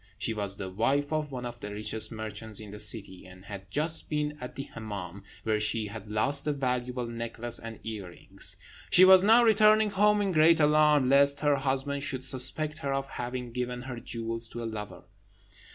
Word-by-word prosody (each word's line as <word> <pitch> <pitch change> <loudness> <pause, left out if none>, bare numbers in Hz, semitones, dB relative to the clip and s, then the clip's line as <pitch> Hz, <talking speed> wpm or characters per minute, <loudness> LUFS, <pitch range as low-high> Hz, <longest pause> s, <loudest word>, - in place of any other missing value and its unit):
She 110 +2 -2
was 100 -2 -3
the 95 -2 -6
wife 140 +9 0
of 150 -2 -2
one 125 -2 -6
of 120 0 -7
the 105 - -7
richest 105 +2 -2
merchants 110 -1 -6
in 105 -2 -8
the 105 - -9
city, 105 -4 -3
and 90 +1 -15
had 100 -2 -9
just 155 - +1
been 150 0 -2
at 125 - -7
the 135 - -4
Hemmâm, 100 -4 -7 0.2
where 110 -1 0
she 105 +1 +1
had 105 0 -9
lost 135 +8 +2
a 150 - +1
valuable 125 -2 -2
necklace 115 0 -3
and 115 -1 -9
earrings. 100 -6 -5 0.3
She 185 - +7
was 190 0 +8
now 225 +5 +6
returning 215 -1 +4
home 210 +1 +3
in 200 -2 0
great 160 0 +5
alarm 150 -2 +4
lest 140 +1 +5
her 145 -2 +2
husband 135 +1 -1
should 135 -2 -2
suspect 150 +5 +1
her 140 -3 -3
of 135 0 -2
having 125 -1 -5
given 125 0 -4
her 130 -2 -7
jewels 115 0 -3
to 120 +1 -7
a - - -4
lover. 105 -5 -7
125 Hz, 195 wpm, -28 LUFS, 110-145 Hz, 0.3 s, was